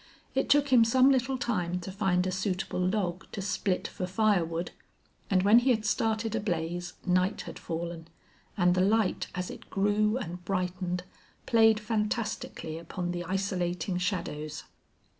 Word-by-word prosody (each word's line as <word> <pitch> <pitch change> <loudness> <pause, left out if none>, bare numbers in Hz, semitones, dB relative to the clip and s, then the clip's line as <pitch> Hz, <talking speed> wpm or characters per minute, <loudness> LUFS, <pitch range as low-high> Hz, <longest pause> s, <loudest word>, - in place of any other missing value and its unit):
It - - 0
took 285 0 +4
him 250 -3 +7
some 255 +4 +5
little 260 0 +1
time 180 -8 -1
to 190 - -6
find 185 -2 +1
a 185 - 0
suitable 190 -1 -2
log 185 -1 -1
to - - -4
split 195 -1 -1
for 180 -4 -5
fire 200 -1 +3
wood, 165 +1 -4 0.6
and 185 -2 +3
when 210 +4 +7
he 250 +2 +1
had 220 -3 +2
started 220 +1 0
a 225 - 0
blaze 175 -3 -3
night 185 +2 +1
had - - -8
fallen, 165 0 -5 0.5
and 180 -2 +4
the 185 - +2
light 210 +1 +2
as 180 0 -3
it - - -11
grew 210 +3 +2
and 180 -7 -6
brightened 180 -1 -2 0.4
played 225 -2 +5
fantastically 210 -6 -2
upon 175 +1 -4
the 175 0 -3
isolating 180 -1 -1
shadows. 155 -5 -3
190 Hz, 160 wpm, -29 LUFS, 180-215 Hz, 0.6 s, him